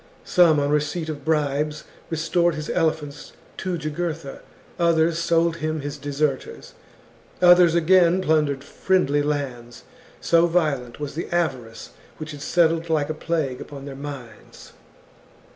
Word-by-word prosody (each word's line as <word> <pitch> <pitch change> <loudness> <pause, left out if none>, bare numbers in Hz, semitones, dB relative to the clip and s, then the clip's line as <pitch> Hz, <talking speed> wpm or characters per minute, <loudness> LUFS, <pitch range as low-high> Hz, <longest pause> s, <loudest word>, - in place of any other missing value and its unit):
Some 170 -5 +4
on 145 0 0
receipt 150 +2 -1
of 145 -3 -6
bribes 150 0 -1 0.3
restored 170 +1 +1
his 155 0 -5
elephants 155 -4 -2 0.2
to 185 -2 -3
Jugurtha, 160 -1 -4 0.4
others 165 -1 +2
sold 165 0 +1
him 155 -1 -3
his 145 0 -5
deserters, 145 -1 -3 0.7
others, 175 -1 +6
again, 175 +1 +4
plundered 150 -5 +1
friendly 145 -2 +1
lands: 130 -5 -4 0.4
so 170 0 +3
violent 150 -9 -1
was 145 -1 -5
the 165 - -4
avarice 130 -10 -3 0.3
which 155 0 -7
had 145 -1 -9
settled 165 0 +1
like 155 -2 0
a - - -2
plague 155 -5 -2
upon 140 -1 -9
their 140 -1 -7
minds. 135 -4 -10
155 Hz, 130 wpm, -23 LUFS, 145-170 Hz, 0.7 s, others